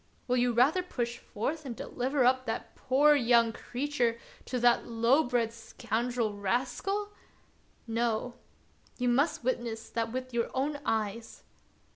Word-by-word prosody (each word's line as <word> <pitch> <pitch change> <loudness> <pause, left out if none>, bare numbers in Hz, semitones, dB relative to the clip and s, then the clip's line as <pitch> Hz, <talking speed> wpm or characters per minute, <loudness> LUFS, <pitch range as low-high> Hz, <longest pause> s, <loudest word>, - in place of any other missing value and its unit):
Will 250 0 +2
you 245 0 +3
rather 260 +10 +4
push 240 -9 -4
forth 295 +9 -4
and 255 -4 -6
deliver 255 +3 -1
up 255 0 +3
that 225 - -4
poor 280 +3 +4
young 235 -4 +4
creature 245 -3 -1 0.3
to 250 - -2
that 240 0 +3
low 235 +5 +3
bred 240 -4 0
scoundrel 230 0 -2
Rascal? 250 - -1 0.8
No; 230 +1 -1 0.6
you 250 - 0
must 270 +4 +2
witness 235 -3 -2
that 230 -1 -1
with 255 0 -5
your 235 -1 0
own 285 +3 -1
eyes. 220 0 -2
245 Hz, 135 wpm, -30 LUFS, 230-260 Hz, 0.8 s, rather